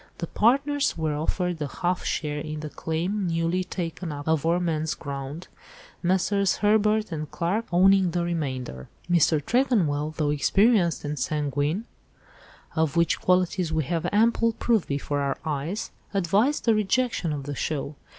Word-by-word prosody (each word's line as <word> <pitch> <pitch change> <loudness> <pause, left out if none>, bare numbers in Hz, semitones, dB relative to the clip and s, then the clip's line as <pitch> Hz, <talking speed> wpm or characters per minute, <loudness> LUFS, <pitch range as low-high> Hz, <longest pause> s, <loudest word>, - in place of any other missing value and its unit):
The 170 - -3
partners 275 - +2
were 160 -2 -1
offered 170 +2 -2
a 145 - -1
half 180 +4 -2
share 150 -1 -2
in 155 0 -5
the 155 -1 -6
claim 180 +5 -2
newly 165 +2 0
taken 175 -2 -5
up 145 0 -7
of 160 -2 +2
four 170 +3 +2
men's 160 -3 -1
ground, 140 +4 -6 0.5
Messrs. 190 +2 +2
Herbert 215 0 +2
and 155 -2 -4
Clarke 195 +7 -1
owning 190 +1 +5
the 175 +1 -1
remainder. 130 - -4 0.2
Mr. 170 -3 +3
Tregonwell, 155 - +1
though 150 -2 +1
experienced 185 +3 +3
and 145 -1 -3
sanguine—of 150 - -4
which 170 0 +2
qualities 180 -2 +1
we 160 -1 +1
have 165 +4 -2
ample 230 +2 +3
proof 225 -3 +1
before 145 0 -2
our 140 -1 -1
eyes—advised 195 - -1
the 230 - +5
rejection 215 -3 0
of 145 -2 -3
the 145 +1 -5
'show. 145 +1 -3
170 Hz, 145 wpm, -25 LUFS, 150-195 Hz, 0.5 s, owning